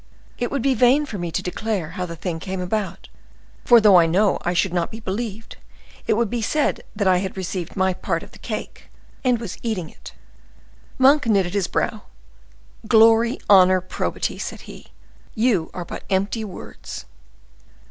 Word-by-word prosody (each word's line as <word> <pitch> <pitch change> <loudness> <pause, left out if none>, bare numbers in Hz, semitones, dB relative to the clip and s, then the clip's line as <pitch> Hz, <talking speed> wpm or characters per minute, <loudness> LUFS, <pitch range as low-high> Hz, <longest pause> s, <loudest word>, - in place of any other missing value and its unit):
It 245 - -1
would 275 -4 -2
be 275 - +3
vain 255 +5 +4
for 210 -8 -6
me 175 -1 -3
to 185 - -2
declare 185 -3 -3
how 180 +1 -4
the 170 - -7
thing 165 0 -4
came 190 +2 -5
about, 195 +2 -3 0.6
for 240 -1 +7
though 210 -4 +7
I 165 - +4
know 190 +4 +2
I 175 - -1
should 180 +1 +1
not 175 -2 0
be 220 - -9
believed, 220 +1 -5 0.5
it - - +3
would 230 +1 +1
be 235 +3 -3
said 295 +7 0
that 205 -2 0
I 185 -1 +5
had 190 0 -5
received 185 -2 -4
my 190 -1 +2
part - - -3
of - - -14
the - - -16
cake, - - -7 0.3
and 250 -3 +2
was 225 -6 -7
eating 200 -9 -3
it." - - -13 0.8
Monk 270 0 +5
knitted 195 -5 +2
his 200 -3 0
brow.—"Glory, 65 - 0
honor, 185 -2 +6
probity!" 185 - -3
said - - -6
he, - - -12 0.5
"you 220 -8 +1
are 180 - -6
but - - -8
empty 200 +4 0
words." 200 -4 -9
195 Hz, 175 wpm, -22 LUFS, 180-225 Hz, 0.8 s, for